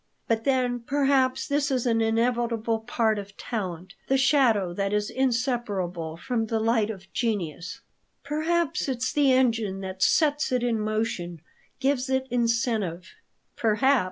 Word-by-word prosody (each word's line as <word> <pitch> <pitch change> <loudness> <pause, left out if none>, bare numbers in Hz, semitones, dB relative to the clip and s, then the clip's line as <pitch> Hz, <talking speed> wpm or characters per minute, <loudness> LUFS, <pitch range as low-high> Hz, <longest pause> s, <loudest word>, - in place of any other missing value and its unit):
But 225 -1 0
then 255 -2 +1
perhaps 270 0 +1
this 285 0 +1
is 260 -3 0
an 230 -2 +2
inevitable 230 0 +1
part 220 -1 0
of 200 0 -10
talent, 185 -5 -5
the 270 - +3
shadow 245 -10 +3
that 195 +2 -1
is 210 0 0
inseparable 220 -10 -1
from 230 +2 -2
the 225 0 0
light 225 -1 +2
of 190 -3 -9
genius." 185 - -3 0.4
"Perhaps 310 +1 0
it's 255 -1 -1
the 285 -2 +4
engine 225 -7 +1
that 190 0 -6
sets 295 +3 +3
it 250 -1 +1
in 235 -2 +1
motion, 215 -6 -2 0.4
gives 265 -1 0
it 265 0 +1
incentive." 225 -7 0 0.4
"Perhaps. 255 +5 +3
230 Hz, 140 wpm, -26 LUFS, 205-260 Hz, 0.4 s, the